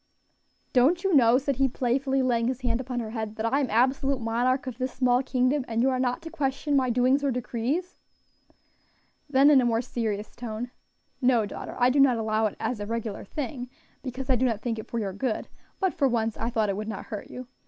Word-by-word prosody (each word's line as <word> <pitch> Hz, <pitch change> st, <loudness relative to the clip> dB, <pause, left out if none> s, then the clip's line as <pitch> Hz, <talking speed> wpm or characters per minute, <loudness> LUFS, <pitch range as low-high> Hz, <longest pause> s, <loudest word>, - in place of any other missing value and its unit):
"Don't 290 Hz, +8 st, +4 dB
you 385 Hz, -2 st, +1 dB
know," 245 Hz, -4 st, +6 dB
said 275 Hz, -1 st, -1 dB
he 270 Hz, 0 st, +3 dB
playfully, 265 Hz, +2 st, 0 dB
laying 235 Hz, -2 st, +1 dB
his 260 Hz, +1 st, -2 dB
hand 240 Hz, -1 st, 0 dB
upon 250 Hz, -1 st, -4 dB
her 220 Hz, -2 st, -5 dB
head, 220 Hz, -2 st, -4 dB
"that 220 Hz, 0 st, -3 dB
I 265 Hz, +5 st, +2 dB
am 270 Hz, -4 st, 0 dB
absolute 265 Hz, +3 st, +2 dB
monarch 245 Hz, +4 st, 0 dB
of 255 Hz, -2 st, -6 dB
this 255 Hz, 0 st, -1 dB
small 250 Hz, -1 st, +2 dB
kingdom, 260 Hz, +1 st, +1 dB
and 230 Hz, +1 st, 0 dB
you 265 Hz, -, +3 dB
are 255 Hz, -, -1 dB
not 250 Hz, +5 st, -1 dB
to 325 Hz, -, -7 dB
question 285 Hz, -1 st, -1 dB
my 260 Hz, -2 st, +3 dB
doings 255 Hz, +4 st, +2 dB
or 280 Hz, -, +2 dB
decrees?" 250 Hz, +8 st, -2 dB, 1.3 s
Then 280 Hz, +1 st, +6 dB
in 275 Hz, -3 st, +6 dB
a -, -, +1 dB
more 230 Hz, 0 st, +1 dB
serious 215 Hz, -3 st, -3 dB
tone, 240 Hz, +1 st, -5 dB, 0.5 s
"No, 245 Hz, -4 st, +3 dB
daughter, -, -, -7 dB
I 250 Hz, +1 st, +4 dB
do 280 Hz, -, +2 dB
not 265 Hz, -3 st, +5 dB
allow 220 Hz, 0 st, +1 dB
it 205 Hz, -, -7 dB
as 250 Hz, -4 st, -2 dB
a 205 Hz, -, -5 dB
regular 230 Hz, -2 st, -4 dB
thing, 250 Hz, +1 st, -5 dB, 0.3 s
because 260 Hz, 0 st, -6 dB
I 260 Hz, -, +3 dB
do 250 Hz, +2 st, +1 dB
not 220 Hz, -3 st, -2 dB
think 230 Hz, -2 st, -2 dB
it -, -, -8 dB
for 235 Hz, -, -3 dB
your 200 Hz, -4 st, -2 dB
good; 220 Hz, +3 st, -2 dB, 0.3 s
but 380 Hz, -3 st, +1 dB
for 275 Hz, -, +2 dB
once, 225 Hz, -3 st, 0 dB
I 230 Hz, -, -2 dB
thought 220 Hz, -3 st, 0 dB
it 195 Hz, -, -1 dB
would 215 Hz, 0 st, -4 dB
not 215 Hz, -3 st, -5 dB
hurt 210 Hz, -, -7 dB
you. 255 Hz, -, -8 dB
250 Hz, 225 wpm, -26 LUFS, 230-265 Hz, 1.3 s, know